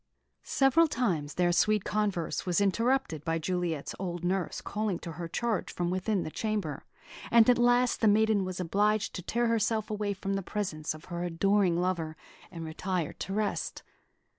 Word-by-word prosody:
Several 280 +5 +3
times 180 - -1
their 175 -1 +3
sweet 210 +3 +3
converse 205 -6 -1
was 180 -1 +1
interrupted 215 - +1
by 165 +1 0
Juliet's 170 -3 -2
old 175 -2 -4
nurse 185 0 -1
calling 210 -3 -2
to 170 - -7
her 170 +2 -6
charge 225 +4 -1
from 175 0 -2
within 185 +1 0
the 155 - -5
chamber; 205 -10 -3 0.4
and 230 -1 +6
at 245 -1 +5
last 245 0 +3
the 225 - +4
maiden 215 -1 +4
was 185 -1 -4
obliged 205 +4 +1
to 180 - -5
tear 235 +7 0
herself 225 -1 +1
away 210 -1 -1
from 195 0 -3
the 195 - -1
presence 170 -6 -3
of 155 - -13
her 175 -1 -4
adoring 180 +1 +2
lover, 170 -3 -1 0.3
and 165 -2 -7
retire 175 +1 -2
to - - -6
rest. 210 0 -2
195 Hz, 170 wpm, -29 LUFS, 175-215 Hz, 0.4 s, and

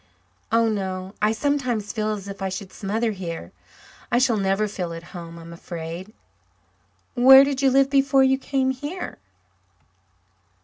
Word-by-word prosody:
"Oh, 230 0 +3
no. 190 -3 -3
I 210 +1 +3
sometimes 245 -4 -1
feel 215 -2 -1
as 200 -2 -5
if 200 -1 -8
I 190 - -1
should 190 0 -7
smother 220 +3 -1
here. 170 - -6 0.6
I 240 - +3
shall 245 -3 +3
never 195 +2 +1
feel 180 -5 -4
at 165 0 -8
home, 170 -2 -8
I 165 - -11
am 170 +1 -10
afraid." 170 +3 -7 1.0
"Where 265 +2 +8
did 275 -1 -1
you 270 - +4
live 270 +1 +3
before 275 -1 +4
you 265 0 +3
came 265 -1 0
here?" 290 +8 -6
215 Hz, 160 wpm, -23 LUFS, 190-265 Hz, 1.0 s, Where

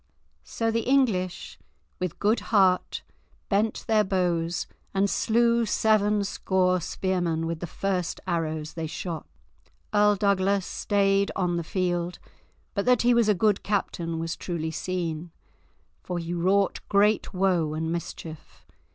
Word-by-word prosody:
So 225 -1 -1
the 230 +1 0
English 215 -10 +1 0.4
with 180 -3 -3
good 215 +3 +2
heart 190 -4 +3 0.5
bent 215 +2 +1
their 215 -1 +3
bows, 175 -3 0 0.3
and 195 +1 +3
slew 235 +3 +2
seven 210 -1 +2
score 185 -2 +1
spearmen 175 -2 -1
with 165 -1 -3
the 175 - -5
first 185 -1 -2
arrows 160 -3 -2
they 165 -1 -4
shot. 165 +1 -5 0.7
Earl 210 0 +5
Douglas 200 -1 +1
stayed 200 -1 +1
on 180 -2 0
the 170 - -2
field, 175 0 -1 0.6
but 200 - -1
that 250 -2 +4
he 245 +1 +5
was 235 -2 +3
a 210 - +4
good 210 +1 +2
captain 170 -5 -2
was 165 0 -3
truly 160 -3 -4
seen, 170 -1 -3 0.7
for 180 - -4
he 170 0 -4
wrought 190 +3 +2
great 205 +1 +3
woe 180 -5 +1
and 160 +1 -2
mischief. 165 -2 -7
185 Hz, 135 wpm, -26 LUFS, 170-205 Hz, 0.7 s, Earl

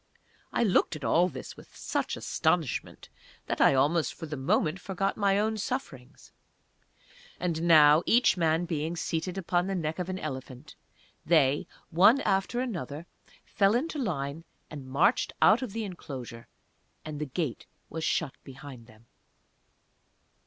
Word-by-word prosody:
I - - +1
looked 190 -5 +2
at 150 - -9
all 170 +10 +3
this - - -9
with - - -16
such - - -2
astonishment - - -1 0.4
that - - -2
I - - +6
almost 150 +5 +1
for 165 - -7
the 150 -1 -5
moment 155 +5 0
forgot 195 +1 -2
my 200 -2 +2
own 220 +1 0
sufferings. 195 - -6 1.1
And 170 -3 -2
now, 155 -2 +6
each 240 -2 +4
man 165 -1 +1
being 165 0 -3
seated 170 +2 -3
upon 180 -1 0
the 195 - -2
neck 160 -1 -3
of 180 0 -3
an 185 - -3
elephant, 130 -6 -7 0.5
they, 145 -4 +3 0.2
one 200 +11 +6
after 195 +4 0
another, 170 - -5 0.4
fell 200 0 +2
into 300 +4 -2
line 155 - -3 0.3
and 140 -4 -8
marched 160 - +2
out 220 +4 +5
of 255 -5 -4
the 225 +2 -3
enclosure, 130 - -8 0.6
and 155 -2 -6
the - - -1
gate 140 -2 -4 0.2
was 160 - -6
shut 155 -3 0
behind 135 -3 -11
them. 110 +1 -19
165 Hz, 145 wpm, -28 LUFS, 145-195 Hz, 1.1 s, I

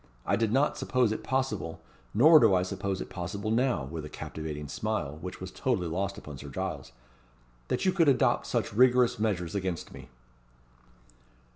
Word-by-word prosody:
I - - +2
did 115 -2 0
not 135 +5 +2
suppose 125 -4 +1
it 110 - -4
possible 105 -12 -2 0.3
nor 155 +9 +7
do 110 -7 +5
I 90 - +2
suppose 95 0 -3
it - - -6
possible 100 +4 -4
now" 120 - +1
with 80 +4 -6
a 75 - -7
captivating 75 -2 -6
smile, 75 - -3
which 90 +1 -7
was 95 0 -7
totally 120 -10 -1
lost 100 +4 -2
upon 75 -8 -9
Sir 70 - -8
Giles 65 - -5 0.8
"that - - -1
you 185 - +4
could 170 -5 +4
adopt 130 -3 +2
such - - -1
rigorous 125 0 +4
measures 90 -6 -1
against 95 -4 -3
me." - - -11
100 Hz, 170 wpm, -29 LUFS, 85-125 Hz, 0.8 s, nor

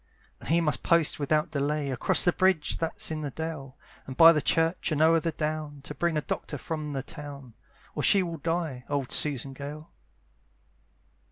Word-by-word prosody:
And - - -10
he 170 +2 +3
must 150 -3 0
post 165 -3 +2
without 150 +2 0
delay 145 0 -1
Across 125 - +3
the 175 - +4
bridge 185 -5 +1
that's 165 -1 -1
in 155 -1 -3
the 145 - -3
dale, 145 -2 -6 0.3
And 130 - -7
by 165 0 +10
the 150 - +1
church, 165 +3 +1
and 150 - 0
o'er 165 +1 +5
the 165 +1 -2
down, 150 -2 -4
To 150 - -7
bring 170 0 0
a - - +1
doctor 145 - -4
from 150 +1 -5
the 135 -2 -3
town, 140 -5 -10 0.4
Or - - -3
she 195 -2 +4
will 170 -2 -5
die, 165 -5 -2
old 140 -3 -2
Susan 140 -2 -1
Gale. 145 +3 -8
150 Hz, 185 wpm, -27 LUFS, 140-165 Hz, 0.4 s, by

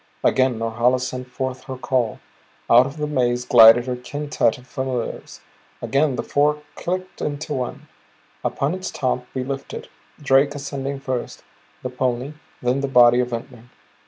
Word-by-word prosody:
Again 130 -2 +3
Norhala 115 +3 +1
sent 130 0 -4
forth 130 0 -4
her 130 -1 -6
call. 125 -3 -1 0.5
Out 125 +2 +7
of 140 +3 -9
the 150 - -1
maze 125 -4 0
glided 120 0 +8
her 125 -1 -2
quintette 145 -1 -1
of 125 - -16
familiars; 130 -2 -4 0.4
again 140 -1 +1
the - - -3
four 150 +1 +1
clicked 185 +1 -4
into 150 +1 -3
one. 125 -3 -4 0.6
Upon 140 +4 -1
its 185 0 -4
top 125 -2 -2
we 130 - -1
lifted, 135 +1 -6 0.3
Drake 140 0 +3
ascending 140 -1 -4
first, 130 -3 -4 0.4
the 125 - -4
pony; 125 +2 -2 0.3
then 125 +3 +1
the 140 - -1
body 120 -2 +6
of 125 - +1
Ventnor. 115 0 -7
130 Hz, 155 wpm, -22 LUFS, 125-140 Hz, 0.6 s, glided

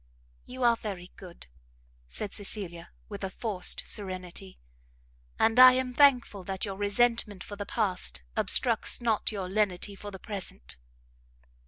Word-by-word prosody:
"You 255 0 -5
are 235 -1 +5
very 190 -5 -7
good," 180 -3 -12 0.6
said 205 - -4
Cecilia, 195 -5 -2 0.2
with - - -8
a 190 - -2
forced 195 -3 0
serenity, 185 - -5 0.8
"and 225 +2 +3
I 255 0 +11
am 255 0 -1
thankful 245 -8 +3
that 190 +2 -3
your 195 -2 -5
resentment 205 0 0
for 205 - -8
the 205 0 -6
past 180 - -2
obstructs - - +2
not 225 -3 0
your 195 -4 -4
lenity 200 0 -1
for 205 +1 -9
the 195 - -9
present." 185 - -7
205 Hz, 140 wpm, -28 LUFS, 185-225 Hz, 0.8 s, I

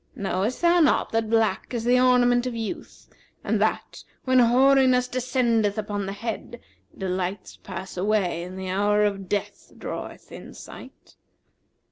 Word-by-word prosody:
Knowest 200 - -2
thou 345 +1 +5
not 310 - +2
that 225 -1 -1
black 225 0 0
is 230 - -2
the 245 +2 +3
ornament 250 -1 +3
of 245 - -4
youth 225 -2 -7 0.4
and - - 0
that, - - -2 0.2
when 255 -1 +3
hoariness 255 +1 +4
descendeth 240 -5 0
upon 205 -2 -3
the - - -3
head, 230 +2 -6 0.4
delights 185 0 -4
pass 190 -1 -8
away 190 -3 0
and 180 +2 -8
the 190 0 -5
hour 205 +2 +2
of 195 -2 -3
death 205 - -4
draweth - - -7
in - - -11
sight? - - -13
225 Hz, 145 wpm, -24 LUFS, 195-250 Hz, 0.4 s, thou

